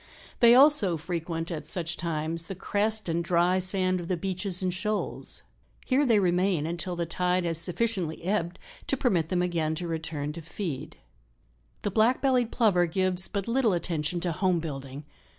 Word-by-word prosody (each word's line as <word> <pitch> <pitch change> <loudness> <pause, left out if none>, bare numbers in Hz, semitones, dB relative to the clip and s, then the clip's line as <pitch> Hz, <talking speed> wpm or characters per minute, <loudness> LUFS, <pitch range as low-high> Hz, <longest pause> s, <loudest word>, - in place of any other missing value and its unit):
They 235 0 +7
also 260 - +6
frequent, 165 0 -4
at 160 -3 -5
such 175 -3 -1
times, 165 0 -3
the 195 - -6
crest 215 +3 +1
and 170 0 0
dry 175 +2 +2
sand 185 0 0
of 170 - -6
the 180 - -1
beaches 185 0 -2
and 180 -1 0
shoals; 210 +3 -2 0.4
here 275 +2 +2
they 230 -3 +4
remain 180 -3 +1
until 170 +2 -3
the 170 0 -2
tide 180 +1 0
has 165 -1 +1
sufficiently 180 -3 -1
ebbed 180 -2 -1 0.3
to 275 - +1
permit 175 - +1
them 180 -1 +1
again 165 -3 -1
to 175 +2 -4
return 155 -3 -3
to 165 - -8
feed." 165 -3 -6 0.9
The 205 - -1
Black 225 +5 +3
bellied 250 -4 +1
Plover 190 -7 +3
gives 185 +1 +2
but 200 -1 -4
little 230 -3 +2
attention 170 -1 -2
to 175 -1 -1
home 185 +1 +1
building. 140 -3 -6
180 Hz, 170 wpm, -27 LUFS, 165-200 Hz, 0.9 s, They